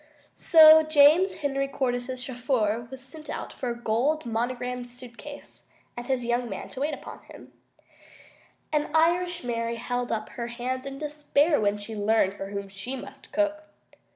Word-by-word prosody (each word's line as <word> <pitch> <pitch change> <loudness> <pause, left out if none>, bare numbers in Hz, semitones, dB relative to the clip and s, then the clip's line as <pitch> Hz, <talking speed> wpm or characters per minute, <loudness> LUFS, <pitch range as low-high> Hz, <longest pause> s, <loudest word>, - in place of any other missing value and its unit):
So 315 -1 +8
James 310 +4 +5
Henry 275 -1 0
Cordyce's 255 -2 -2
chauffeur 240 -3 -1
was 265 -1 -9
sent 305 +3 -10 0.2
for 255 - -4
a 235 - -3
gold 245 +7 0
monogrammed 245 +1 -3
suitcase 250 +4 -11 0.3
and 240 0 -7
his 255 -2 0
young 240 0 0
man 195 - -6
to - - -8
wait 300 +2 0
upon - - -10
him, - - -14 1.2
and 300 0 +1
Irish 350 +2 +2
Mary 230 -1 -2
held 245 +1 -3
up 215 -1 -2
her 235 -1 -5
hands 255 +2 -4
in 275 0 -6
despair 295 0 +1
when 205 0 +1
she 210 +2 -7
learned 205 -2 +2
for 195 -1 -6
whom 200 0 -5
she 195 +7 -6
must 260 - -11
cook. 310 0 0
250 Hz, 155 wpm, -26 LUFS, 235-295 Hz, 1.2 s, So